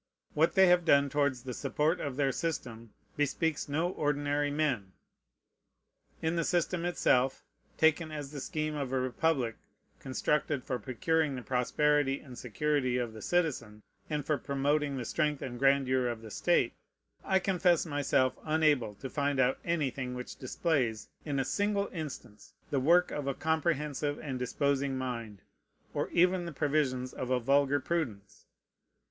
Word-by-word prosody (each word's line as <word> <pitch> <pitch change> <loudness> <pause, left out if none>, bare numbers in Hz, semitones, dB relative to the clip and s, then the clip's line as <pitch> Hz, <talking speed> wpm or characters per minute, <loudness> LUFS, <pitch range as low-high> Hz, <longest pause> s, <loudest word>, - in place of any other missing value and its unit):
What 160 +5 +2
they 190 -1 +7
have 180 -1 +5
done 140 -3 +4
towards 140 -4 +1
the 130 - -5
support 155 +8 0
of 140 -3 -3
their 135 -1 +1
system 120 -9 -4 0.2
bespeaks 150 +1 0
no 160 +5 0
ordinary 145 -2 0
men. 135 -11 -1 1.3
In 160 +1 +1
the 170 - +1
system 175 +1 0
itself, 135 -6 +2 0.3
taken 160 0 +3
as 145 -2 -6
the 145 - -6
scheme 155 +2 -2
of 140 -3 -3
a 130 - +1
republic 130 -2 0 0.4
constructed 140 +1 -1
for 125 -2 -3
procuring 145 +6 0
the 125 - -6
prosperity 135 +3 +1
and 130 -3 -12
security 130 +2 0
of 120 -3 -2
the 110 - -9
citizen, 135 -12 -1 0.3
and 150 -2 -2
for 150 -2 0
promoting 140 0 0
the 125 - -4
strength 150 +2 0
and 120 -2 -6
grandeur 135 -2 +3
of 115 -2 -4
the 110 - -9
state, - - +2 0.5
I 190 - +2
confess 180 -3 +2
myself 140 -4 +1
unable 155 -9 +2
to 135 - -7
find 140 0 -1
out 130 0 +2
anything 135 -6 -1
which 125 0 -7
displays, 130 -5 -1 0.2
in 145 -3 -2
a 135 - 0
single 205 +4 0
instance, 145 - -8 0.2
the 140 - +2
work 170 +6 +4
of 145 -2 -4
a 140 - -1
comprehensive 150 -2 -1
and 135 -4 -5
disposing 140 +1 0
mind, 115 -7 -5 0.5
or - - -1
even 180 +1 +3
the - - -5
provisions 140 -4 0
of 125 - -5
a 130 -1 +2
vulgar 140 +3 +3
prudence. 130 - -4
140 Hz, 155 wpm, -31 LUFS, 130-155 Hz, 1.3 s, they